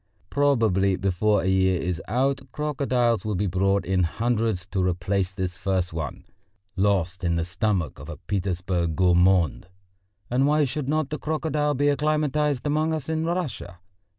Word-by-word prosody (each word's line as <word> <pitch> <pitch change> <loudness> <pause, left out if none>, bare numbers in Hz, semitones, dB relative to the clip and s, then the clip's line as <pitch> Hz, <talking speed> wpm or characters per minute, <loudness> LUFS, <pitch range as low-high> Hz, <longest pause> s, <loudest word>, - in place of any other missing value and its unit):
Probably 110 -9 +2
before 100 +2 +1
a - - -1
year 95 -1 +2
is 90 -1 -2
out 130 +3 +1
crocodiles 130 -6 0
will 105 -2 -2
be 100 +3 0
brought 95 +1 +1
in 95 0 +1
hundreds 110 +1 0
to 95 - 0
replace 90 +1 0
this 95 -2 -4
first 95 -3 -1
one, 80 -1 -5 0.5
lost 95 -2 0
in 85 -1 +1
the 85 -1 -1
stomach 90 -4 -1
of - - -9
a - - -7
Petersburg 90 -4 -2
gourmand. 90 0 +3 0.6
And 130 +3 +2
why 150 +1 +3
should 140 0 -3
not 155 -1 0
the 150 - -3
crocodile 150 -1 -1
be 145 +2 +1
acclimatised 150 -2 0
among 155 +2 +1
us 155 -1 -6
in 160 0 -1
Russia? 165 - -3
100 Hz, 155 wpm, -25 LUFS, 90-145 Hz, 0.6 s, gourmand